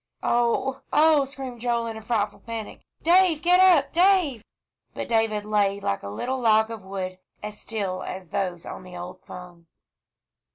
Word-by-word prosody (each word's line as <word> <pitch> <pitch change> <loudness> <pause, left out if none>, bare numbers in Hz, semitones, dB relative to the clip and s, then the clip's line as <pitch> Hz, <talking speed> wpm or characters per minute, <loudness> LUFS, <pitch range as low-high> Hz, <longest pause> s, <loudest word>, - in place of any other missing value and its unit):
"Oh 240 +2 +1
oh!" 305 -2 +5
screamed 265 -3 -8
Joel, 235 -1 0
in 225 -1 -5
a 220 - -8
frightful 215 -2 -1
panic. 230 -2 -7 0.2
"Dave 345 -2 +4
get 360 +1 +5
up, 350 -7 +5
Dave!" 345 - +3 0.5
But - - -4
David 225 -2 +1
lay 200 -2 +1
like 100 - -2
a 100 - -7
little 255 - -3
log 220 -1 +3
of 220 -4 -7
wood, 185 -1 -5 0.2
as 210 0 -7
still 200 -4 -3
as 185 -2 -7
those 180 -4 -2
on - - -7
the 180 -1 -10
old 180 +1 -9
pung. 175 -2 -11
220 Hz, 165 wpm, -25 LUFS, 190-270 Hz, 0.5 s, oh